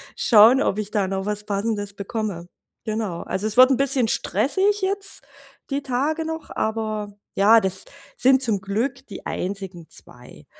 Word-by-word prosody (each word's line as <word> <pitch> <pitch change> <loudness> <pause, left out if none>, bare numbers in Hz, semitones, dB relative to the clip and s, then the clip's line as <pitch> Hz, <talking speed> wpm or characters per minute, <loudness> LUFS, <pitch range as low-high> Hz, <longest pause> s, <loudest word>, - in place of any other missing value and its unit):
schauen, 235 +4 +6
ob 200 - 0
ich 210 -1 -4
da 200 -3 0
noch 190 0 -3
was 210 0 -3
Passendes 205 0 -2
bekomme. 200 -4 -4 0.4
Genau. 215 -6 -3
Also, 205 +3 -3
es 215 - -3
wird 255 +1 +8
'n 260 - +3
bisschen 270 -3 +3
stressig 390 - +1
jetzt 395 +1 -1 0.5
die 280 - -1
Tage 280 +5 -1
noch, 320 0 -6
aber 215 -1 -3 0.2
ja, 215 +4 +6
das 190 -2 -1 0.3
sind 265 +1 +4
zum 215 -6 0
Glück 245 +8 -3
die 200 - -10
einzigen 185 -3 -5
2. - - -15
220 Hz, 160 wpm, -22 LUFS, 200-265 Hz, 0.5 s, wird